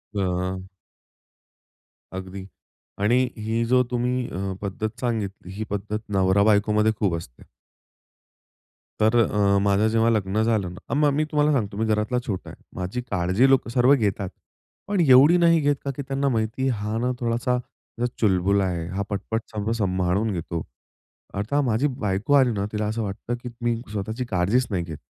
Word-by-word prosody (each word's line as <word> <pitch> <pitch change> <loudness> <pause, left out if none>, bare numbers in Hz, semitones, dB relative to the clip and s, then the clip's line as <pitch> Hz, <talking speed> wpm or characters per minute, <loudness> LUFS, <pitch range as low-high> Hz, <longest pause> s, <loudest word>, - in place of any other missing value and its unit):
अ 95 -1 -1 1.5
अगदी 95 0 -7 0.6
आणि 110 +5 +3 0.2
ही 110 +2 -1
जो 125 +2 +4
तुम्ही 125 0 0
अ, 95 +1 -3
पद्धत 110 +3 -4
सांगितली, 105 -7 -3
ही 105 +3 -4
पद्धत 105 +1 -3
नवरा 95 0 +3
बायकोमध्ये 105 +1 +3
खूप 95 -5 +1
असते. 80 -8 -9 1.6
तर 110 +2 +3
अ, 100 -3 +3
माझं 100 +2 +2
जेव्हा 115 +1 +3
लग्न 105 -2 +1
झालं 110 -5 +1
ना, 100 +7 -8
मग 150 +1 +3
मी 150 +2 +1
तुम्हाला 150 0 +3
सांगतो 105 -7 -1
मी 110 - 0
घरातला 110 +3 +1
छोटा 95 -5 -4
आहे. - - -14 0.2
माझी 95 +7 -3
काळजी 100 +4 +2
लोकं 135 -3 +3
सर्व 125 +3 +4
घेतात. 100 -6 0 0.6
पण 200 -2 0
एवढी 145 +3 +7
नाही 170 -1 +5
घेत 145 0 +2
का 140 - 0
की 140 - -4
त्यांना 140 0 0
माहिती 115 +2 -1
हा 105 -2 -2
ना 125 +2 0
थोडासा 120 +1 0 0.6
चुलबुला 100 -1 +2
आहे, 85 -3 -2
हा 95 +1 -3
पटपट 105 +3 -2
सगळं 105 +1 -2
संभाळून 95 0 0
घेतो. 85 -1 -4 0.7
आता 105 +9 0
माझी 125 +2 +1
बायको 105 -1 -1
आली 130 -3 +5
ना, 100 -1 -2
तिला 105 0 -2
असं 110 +2 -2
वाटतं 105 +4 -4
की 125 - -5
मी 120 0 +1 0.2
स्वतःची 110 +4 -3
काळजीच 105 +5 +1
नाही 90 -3 0
घेत. 80 -3 -7
110 Hz, 160 wpm, -24 LUFS, 100-125 Hz, 1.6 s, एवढी